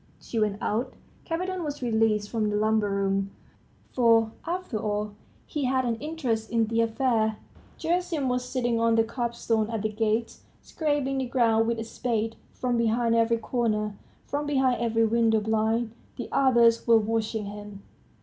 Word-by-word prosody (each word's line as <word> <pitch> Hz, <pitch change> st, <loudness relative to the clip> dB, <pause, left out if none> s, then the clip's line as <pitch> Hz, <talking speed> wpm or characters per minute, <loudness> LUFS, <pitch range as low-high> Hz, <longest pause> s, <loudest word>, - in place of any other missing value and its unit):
She 230 Hz, -, -4 dB
went 210 Hz, -2 st, +1 dB
out. 235 Hz, +5 st, -1 dB, 0.3 s
Kapiton 365 Hz, +2 st, -2 dB
was 290 Hz, -3 st, -5 dB
released 220 Hz, -3 st, +1 dB
from 220 Hz, -2 st, 0 dB
the 210 Hz, -, -1 dB
lumber 215 Hz, 0 st, +2 dB
room; 195 Hz, 0 st, 0 dB, 0.6 s
for, 230 Hz, -3 st, +4 dB, 0.2 s
after 350 Hz, -10 st, -3 dB
all, 210 Hz, 0 st, -2 dB, 0.3 s
he 295 Hz, -3 st, -3 dB
had 260 Hz, 0 st, +1 dB
an 235 Hz, -, +1 dB
interest 245 Hz, -6 st, -2 dB
in 230 Hz, -1 st, +2 dB
the 230 Hz, +1 st, +1 dB
affair. 225 Hz, -2 st, +1 dB, 0.4 s
Gerasim 335 Hz, -4 st, -1 dB
was 250 Hz, 0 st, 0 dB
sitting 240 Hz, -3 st, 0 dB
on 230 Hz, 0 st, +3 dB
the 225 Hz, -, +4 dB
curbstone 230 Hz, -2 st, -1 dB
at 220 Hz, -2 st, -2 dB
the 215 Hz, -, +1 dB
gates, 220 Hz, +1 st, -1 dB, 0.2 s
scraping 290 Hz, -4 st, -1 dB
the 260 Hz, -, -2 dB
ground 225 Hz, -3 st, +2 dB
with 235 Hz, 0 st, 0 dB
a 225 Hz, -, -3 dB
spade.... 225 Hz, -1 st, -2 dB, 0.2 s
From 245 Hz, -1 st, -1 dB
behind 230 Hz, 0 st, +2 dB
every 230 Hz, 0 st, +3 dB
corner, 215 Hz, -3 st, -1 dB, 0.3 s
from 290 Hz, +1 st, -3 dB
behind 265 Hz, -4 st, +2 dB
every 225 Hz, -1 st, +2 dB
window 225 Hz, 0 st, +3 dB
blind, 220 Hz, +2 st, 0 dB, 0.2 s
the 240 Hz, -, -6 dB
others 235 Hz, -4 st, +4 dB
were 230 Hz, -1 st, +7 dB
watching 220 Hz, 0 st, -1 dB
him. 205 Hz, -1 st, -9 dB
230 Hz, 160 wpm, -27 LUFS, 220-250 Hz, 0.6 s, were